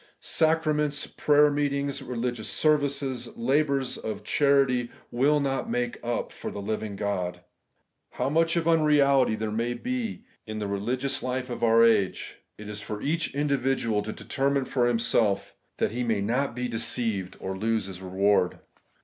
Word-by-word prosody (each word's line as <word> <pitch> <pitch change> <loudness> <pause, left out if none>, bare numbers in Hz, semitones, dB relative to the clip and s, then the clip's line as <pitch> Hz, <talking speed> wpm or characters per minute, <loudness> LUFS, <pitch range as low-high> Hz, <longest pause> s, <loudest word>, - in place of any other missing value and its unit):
Sacra 160 -1 +1
ments, 150 -1 0
prayer 150 0 +3
meetings, 140 -1 -1
religious 120 -3 -3
services, 140 -5 0
labours 135 +1 +1
of 105 -2 -5
charity, 135 -2 +2 0.2
wiU 145 +5 +3
not 140 +9 -1
make 245 +1 -2
up 120 0 -2
for - - -6
the - - -6
living 105 0 -3
God. 90 -3 -2 0.7
How 125 - -1
much 165 +3 +2
of 170 -1 0
unreality 145 -6 +4
there 110 0 -3
may 115 +3 -1
be 250 - -3 0.2
in 110 0 -5
the 105 - -3
re 100 0 -2
ligious 130 +6 -2
life 130 0 -3
of 120 - -5
our 115 0 +6
age, 105 -5 +1 0.2
it 105 - -9
is 105 0 -6
for 105 +1 -5
each 155 +4 -1
individual 135 -6 +1
to 105 +1 -5
determine 135 +3 -1
for 125 -2 +1
himself, 110 -4 +1 0.2
that - - 0
he 125 +2 -2
may 115 -3 0
not 120 +5 0
be 125 0 -2
deceived 115 -4 -1
nor 95 0 -4
lose 110 +1 0
his 95 -1 -8
reward. 95 0 +2
125 Hz, 160 wpm, -27 LUFS, 110-140 Hz, 0.7 s, our